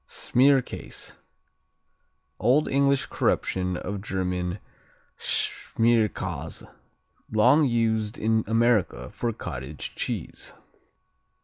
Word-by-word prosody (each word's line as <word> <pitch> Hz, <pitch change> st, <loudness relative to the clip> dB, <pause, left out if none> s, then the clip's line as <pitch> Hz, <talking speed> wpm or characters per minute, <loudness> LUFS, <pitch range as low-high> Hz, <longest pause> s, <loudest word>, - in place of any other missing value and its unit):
Smearcase 135 Hz, +1 st, +1 dB, 1.2 s
Old 130 Hz, +7 st, +3 dB
English 140 Hz, 0 st, +2 dB
corruption 90 Hz, -1 st, 0 dB
of 100 Hz, +2 st, -4 dB
German 90 Hz, -2 st, -2 dB, 0.6 s
Schmierkäse, 115 Hz, -2 st, 0 dB, 0.6 s
long 125 Hz, +8 st, +5 dB
used 110 Hz, -3 st, 0 dB
in 110 Hz, 0 st, +1 dB
America 115 Hz, -, +2 dB
for 120 Hz, -, -2 dB
cottage 70 Hz, -, -6 dB
cheese. -, -, -5 dB
110 Hz, 75 wpm, -26 LUFS, 95-120 Hz, 1.2 s, long